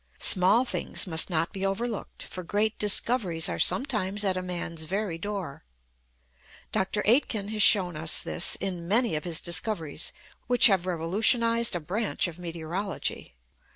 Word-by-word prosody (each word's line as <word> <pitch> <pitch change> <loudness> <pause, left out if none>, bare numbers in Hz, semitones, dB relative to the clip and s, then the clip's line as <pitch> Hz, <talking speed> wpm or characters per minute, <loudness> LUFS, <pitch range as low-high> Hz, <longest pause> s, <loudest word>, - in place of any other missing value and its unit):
Small 195 +7 +3
things 240 - 0
must 160 -1 +3
not 165 +1 -1
be 195 -1 -5
overlooked, 210 +3 -3
for 185 - -8
great 205 +5 -1
discoveries 200 -5 +1
are - - -4
sometimes 210 -6 +1
at 190 -2 +1
a 185 - -2
man's 175 -3 -5
very 190 -1 -3
door. 195 - -6 1.1
Dr. 200 +2 -1
Aitken 220 -3 +2
has 215 0 -2
shown 185 -5 +6
us 155 +1 +1
this 175 - +2
in 180 -3 -4
many 230 +3 +1
of 150 - -4
his 170 -2 -2
discoveries 170 -3 -2 0.4
which 245 0 +5
have 190 -5 +4
revolutionised 225 +7 +1
a - - -1
branch 190 +6 -2
of 175 0 -9
meteorology. 170 - -5
190 Hz, 150 wpm, -27 LUFS, 170-215 Hz, 1.1 s, shown